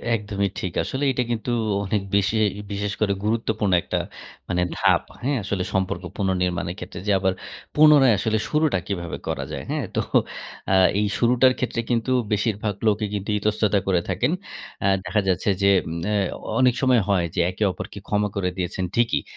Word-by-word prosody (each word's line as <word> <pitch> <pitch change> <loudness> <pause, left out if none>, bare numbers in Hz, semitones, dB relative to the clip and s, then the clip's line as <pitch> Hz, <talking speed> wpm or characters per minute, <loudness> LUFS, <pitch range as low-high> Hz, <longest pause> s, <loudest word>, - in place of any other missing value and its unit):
একদমই 100 -2 -2
ঠিক। 90 -1 -4
আসলে 135 +2 -3
এটা 125 -1 0
কিন্তু 120 +1 -2 0.3
অনেক 100 +1 0
বেশি 100 +2 +2 0.4
বিশেষ 100 0 -2
করে 100 -2 +2
গুরুত্বপূর্ণ 110 -2 0
একটা - - -2 0.5
মানে 90 -1 +1 0.2
ধাপ, - - +4 0.2
হ্যাঁ? 140 +2 +1
আসলে 100 -1 -2
সম্পর্ক 95 -1 -1
পুনর্নির্মাণের 90 -3 -1
ক্ষেত্রে 90 - -7
যে, - - +3
আবার 95 0 +1 0.4
পুনরায় 150 -5 +7
আসলে 110 +3 0
শুরুটা 150 -9 +2
কীভাবে 85 -4 -4
করা - - -2
যায়, - - -5
হ্যাঁ? - - -1
তো - - +2 0.7
আ - - +5 0.2
এই 105 - +2
শুরুটার 125 +3 +4
ক্ষেত্রে 120 -2 -1
কিন্তু 120 +1 0 0.2
বেশিরভাগ 105 0 0
লোকই 105 0 +2
কিন্তু 100 0 -4
ইতস্ততা 105 -1 +1
করে 90 -3 +2
থাকেন। 100 - +1 0.5
অ্যা 100 - +2 0.2
দেখা 95 +4 +1
যাচ্ছে 95 +2 +1
যে, 100 - +6 0.2
উম 85 +1 -4
অ্যা 105 - +1 0.4
অনেক 130 -1 +5
সময় 130 -3 +4
হয় 95 -4 +2
যে - - -1
একে 95 - -3
অপরকে 100 - -8
ক্ষমা 105 0 +1
করে 95 -2 0
দিয়েছেন 95 +1 -2
ঠিকই। 120 -1 +2
105 Hz, 170 wpm, -23 LUFS, 95-115 Hz, 0.7 s, পুনরায়